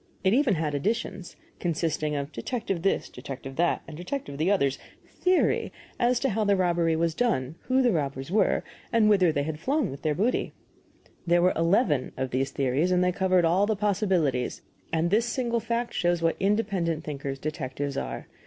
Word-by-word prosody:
It 190 Hz, +1 st, +3 dB
even 255 Hz, -5 st, +3 dB
had 155 Hz, -2 st, -1 dB
additions 190 Hz, +3 st, -2 dB, 0.2 s
consisting 160 Hz, -3 st, -1 dB
of 140 Hz, +1 st, -3 dB
Detective 195 Hz, -7 st, -3 dB
This, 195 Hz, -, +1 dB
Detective 135 Hz, 0 st, -8 dB
That, 175 Hz, +1 st, +1 dB
and 155 Hz, -, -8 dB
Detective 175 Hz, -, -5 dB
The 165 Hz, +4 st, +2 dB
Other's 140 Hz, -10 st, +2 dB, 0.3 s
"Theory" 365 Hz, 0 st, +1 dB, 0.3 s
as 245 Hz, 0 st, +3 dB
to 270 Hz, -, +2 dB
how 220 Hz, +1 st, 0 dB
the 200 Hz, -1 st, +3 dB
robbery 170 Hz, -3 st, +2 dB
was 165 Hz, 0 st, +1 dB
done, 160 Hz, -, 0 dB
who 260 Hz, +1 st, +3 dB
the 245 Hz, -, +4 dB
robbers 140 Hz, -3 st, -2 dB
were, 200 Hz, -1 st, +2 dB, 0.3 s
and 215 Hz, -2 st, +4 dB
whither 185 Hz, -5 st, +4 dB
they 145 Hz, -2 st, 0 dB
had 150 Hz, 0 st, -4 dB
flown 275 Hz, -, 0 dB
with 135 Hz, -, -8 dB
their 155 Hz, -2 st, 0 dB
booty. 220 Hz, -, 0 dB, 0.7 s
There 175 Hz, +1 st, +4 dB
were 180 Hz, -, +4 dB
eleven 165 Hz, -, +2 dB
of 130 Hz, -1 st, -2 dB
these 135 Hz, +2 st, 0 dB
theories, 140 Hz, +6 st, 0 dB
and 180 Hz, 0 st, +3 dB
they 180 Hz, -, +2 dB
covered 185 Hz, -1 st, +2 dB
all 185 Hz, +5 st, +3 dB
the 220 Hz, -, +1 dB
possibilities; 190 Hz, -, 0 dB, 0.3 s
and 165 Hz, +1 st, +1 dB
this 225 Hz, +3 st, +3 dB
single 235 Hz, -1 st, 0 dB
fact 235 Hz, +2 st, -2 dB
shows 175 Hz, -1 st, +1 dB
what 165 Hz, -, +2 dB
independent 195 Hz, -6 st, 0 dB
thinkers 140 Hz, -2 st, -4 dB
detectives 140 Hz, -1 st, -4 dB
are. 60 Hz, -1 st, -4 dB
175 Hz, 180 wpm, -27 LUFS, 150-210 Hz, 0.7 s, the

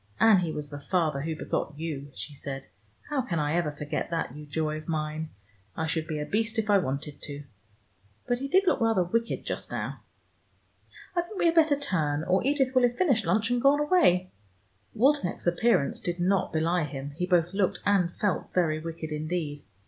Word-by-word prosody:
"And 220 Hz, -4 st, +7 dB
he 170 Hz, -3 st, -1 dB
was 150 Hz, -2 st, -5 dB
the 145 Hz, 0 st, -7 dB
father 155 Hz, -2 st, 0 dB
who 160 Hz, +2 st, -3 dB
begot 150 Hz, -1 st, -3 dB
you," 150 Hz, -3 st, -5 dB
she 105 Hz, +9 st, -6 dB
said. 135 Hz, -1 st, -6 dB, 0.5 s
"How 285 Hz, -3 st, +1 dB
can 185 Hz, -9 st, -3 dB
I 150 Hz, 0 st, 0 dB
ever 170 Hz, -3 st, +1 dB
forget 150 Hz, +1 st, -4 dB
that, 165 Hz, -6 st, -2 dB
you 150 Hz, 0 st, -9 dB
joy 155 Hz, +1 st, -1 dB
of 155 Hz, -, -10 dB
mine? 155 Hz, -1 st, -2 dB, 0.5 s
I 160 Hz, -, 0 dB
should 160 Hz, 0 st, -1 dB
be 155 Hz, -2 st, -3 dB
a 150 Hz, -, -2 dB
beast 225 Hz, +4 st, -1 dB
if 215 Hz, -1 st, +1 dB
I 200 Hz, -, +6 dB
wanted 140 Hz, -2 st, -4 dB
to. 145 Hz, 0 st, -6 dB, 0.8 s
But 245 Hz, 0 st, +1 dB
he 275 Hz, -, -3 dB
did 380 Hz, +7 st, +4 dB
look 345 Hz, -, +2 dB
rather 225 Hz, -5 st, +3 dB
wicked 230 Hz, +6 st, -1 dB
just -, -, -4 dB
now. -, -, -4 dB, 1.1 s
I 345 Hz, -, +3 dB
think 365 Hz, +4 st, -9 dB
we -, -, +1 dB
had 335 Hz, -, +5 dB
better 315 Hz, -3 st, +4 dB
turn, 155 Hz, -, 0 dB
or 185 Hz, +2 st, +2 dB
Edith 270 Hz, -1 st, +2 dB
will 255 Hz, -, +5 dB
have 245 Hz, 0 st, +2 dB
finished 250 Hz, -, +2 dB
lunch 215 Hz, +7 st, +2 dB
and 245 Hz, -1 st, +1 dB
gone 280 Hz, +2 st, +5 dB
away." 295 Hz, -, +3 dB, 0.6 s
Waldenech's 260 Hz, -5 st, +2 dB
appearance 175 Hz, -2 st, +2 dB
did 175 Hz, 0 st, -3 dB
not 185 Hz, +2 st, +1 dB
belie 165 Hz, +1 st, +1 dB
him: 140 Hz, 0 st, -6 dB
he 180 Hz, +5 st, -3 dB
both 175 Hz, -1 st, +2 dB
looked 195 Hz, -2 st, +1 dB
and 195 Hz, -4 st, +3 dB
felt 205 Hz, -2 st, -1 dB
very 160 Hz, -4 st, +2 dB
wicked 160 Hz, 0 st, -6 dB
indeed. 150 Hz, -1 st, -3 dB
175 Hz, 200 wpm, -28 LUFS, 155-225 Hz, 1.1 s, And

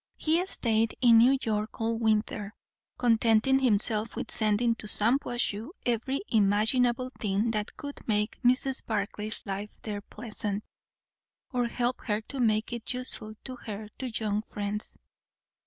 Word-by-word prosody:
He 325 Hz, +3 st, +2 dB
stayed 225 Hz, -, +1 dB
in 235 Hz, -3 st, +7 dB
New 255 Hz, +4 st, +6 dB
York 215 Hz, -1 st, -2 dB
all 225 Hz, 0 st, 0 dB
winter, 215 Hz, -2 st, 0 dB, 0.4 s
contenting 230 Hz, +2 st, +4 dB
himself 220 Hz, -2 st, +2 dB
with -, -, -4 dB
sending 220 Hz, +2 st, +2 dB
to 210 Hz, -, -5 dB
Shampuashuh 235 Hz, 0 st, 0 dB, 0.2 s
every 245 Hz, +3 st, 0 dB
imaginable 230 Hz, +4 st, +3 dB
thing 210 Hz, +2 st, +1 dB
that 210 Hz, -2 st, -3 dB
could 285 Hz, -1 st, -7 dB
make 210 Hz, -1 st, 0 dB
Mrs. 255 Hz, +2 st, +2 dB
Barclay's 210 Hz, 0 st, -2 dB
life 200 Hz, +1 st, -5 dB
there 205 Hz, -2 st, -4 dB
pleasant, 210 Hz, -1 st, -4 dB, 0.9 s
or 245 Hz, -1 st, +1 dB
help 245 Hz, +1 st, -1 dB
her 210 Hz, -2 st, +1 dB
to 275 Hz, -, -5 dB
make 220 Hz, -1 st, +2 dB
it 235 Hz, -2 st, -3 dB
useful 215 Hz, -4 st, -5 dB
to 255 Hz, -1 st, -7 dB
her 215 Hz, -2 st, -7 dB
two 260 Hz, -, -3 dB
young 210 Hz, -1 st, 0 dB
friends. 205 Hz, +1 st, -3 dB
225 Hz, 140 wpm, -29 LUFS, 210-245 Hz, 0.9 s, in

